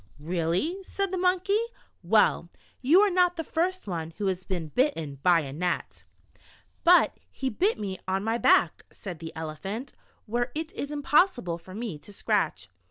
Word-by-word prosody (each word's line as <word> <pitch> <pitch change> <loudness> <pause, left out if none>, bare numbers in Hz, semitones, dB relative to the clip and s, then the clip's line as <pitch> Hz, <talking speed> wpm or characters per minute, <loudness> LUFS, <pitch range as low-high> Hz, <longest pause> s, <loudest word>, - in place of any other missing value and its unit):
"Really?" 175 - -1
said 390 0 -3
the 375 - -1
Monkey. 370 +3 +2 0.4
"Well, - - +3 0.3
you 310 +9 +6
are 415 -1 +4
not 360 -1 +3
the 325 - -3
first 360 +4 -1
one 165 -4 -4
who 210 - -2
has 185 -1 -1
been 175 -5 -3
bitten 160 - 0
by 175 +1 +5
a 135 -2 -6
gnat." 175 +4 -3 0.8
"But 355 +1 +5
he 265 -1 -3
bit 390 - +1
me 195 -3 -4
on 190 +1 0
my 225 +2 0
back," 170 -6 +4
said 180 -5 -8
the 165 0 -7
Ele 160 -1 -4
phant, 215 - -6 0.3
"where 240 +2 -1
it 320 +4 -4
is 285 - -4
impossible 285 - +2
for 185 +3 -12
me 215 -9 -5
to 175 - -12
scratch. 200 - -1
220 Hz, 170 wpm, -27 LUFS, -, 0.8 s, you